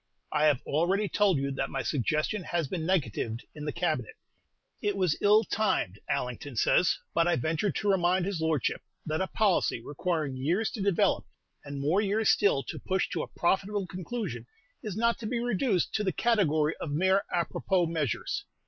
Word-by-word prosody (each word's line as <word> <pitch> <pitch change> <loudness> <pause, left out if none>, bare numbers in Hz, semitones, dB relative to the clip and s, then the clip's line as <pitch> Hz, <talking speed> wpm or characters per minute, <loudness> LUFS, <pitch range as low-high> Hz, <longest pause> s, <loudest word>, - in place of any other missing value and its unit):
I 150 0 +2
have 145 -4 +3
already 185 +8 +1
told 195 -4 +3
you 140 0 -1
that 135 - -2
my 135 -1 -3
suggestion 155 - 0
has 170 -4 -2
been 160 +1 -3
negatived 120 - -1
in 150 -1 -7
the 150 - -1
Cabinet: 155 -10 -2 0.7
it 205 -1 0
was 180 -5 +2
ill 210 +2 +5
timed, 200 - 0
Allington 125 +2 -3
says; 170 +9 +3 0.2
but 170 0 +3
I 175 - +3
ventured 160 - -1
to 205 -1 +1
remind 180 -1 +2
his 190 -4 -2
Lordship 160 -4 0 0.2
that 155 +2 -1
a 190 - 0
policy 200 - +1
requiring 150 +2 -2
years 175 +12 0
to 220 - -5
develop, 195 -3 +2 0.4
and 140 -1 -6
more 155 +8 +2
years 210 +1 +1
still 170 -10 +3
to - - -6
push 190 0 -1
to 170 - -2
a - - -4
profitable 195 +3 0
conclusion, 180 - -5 0.3
is 210 -2 -5
not 235 +1 +2
to 220 - -4
be 240 +1 -1
reduced 230 - 0
to 210 - 0
the 190 - +1
category 160 -8 +2
of 160 - -5
mere 190 +6 +3
à 170 -1 +1
propos 180 -3 0
measures. 155 -8 -2
175 Hz, 185 wpm, -29 LUFS, 150-200 Hz, 0.7 s, ill